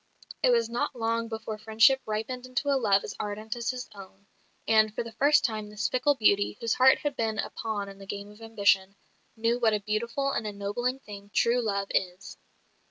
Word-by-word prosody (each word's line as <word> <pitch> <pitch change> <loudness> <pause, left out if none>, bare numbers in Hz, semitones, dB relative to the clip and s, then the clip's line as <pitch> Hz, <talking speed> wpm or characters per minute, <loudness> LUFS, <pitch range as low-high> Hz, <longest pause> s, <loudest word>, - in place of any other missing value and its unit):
It - - +4
was 235 -2 +3
not 245 +4 -2
long 230 0 -1
before 220 -1 -6
friendship 225 +5 +4
ripened 235 +4 -4
into 255 +3 -2
a 280 - +3
love 205 -6 +3
as - - -6
ardent 215 +2 -4
as 235 -1 -3
his 255 -1 -4
own; 195 0 -13 0.4
and 215 -1 +4
for 240 - -1
the 230 - -9
first 285 +6 +3
time 215 -3 -3
this 210 0 -2
fickle 255 +3 +2
beauty, 205 -4 +2
whose 230 -1 0
heart 260 +1 +6
had 290 -2 -3
been 220 -3 -1
a - - -3
pawn 215 -3 -4
in 195 0 -11
the 195 - -11
game 200 +1 -6
of 210 +2 -17
ambition, 200 -3 +2 0.4
knew 230 +2 +1
what 225 -3 +3
a - - -1
beautiful 235 +7 -1
and 220 - -2
ennobling 210 +5 -2
thing 200 -3 -11
true 240 +1 +3
love 200 -3 -2
is. 180 0 -3
220 Hz, 205 wpm, -28 LUFS, 205-240 Hz, 0.4 s, heart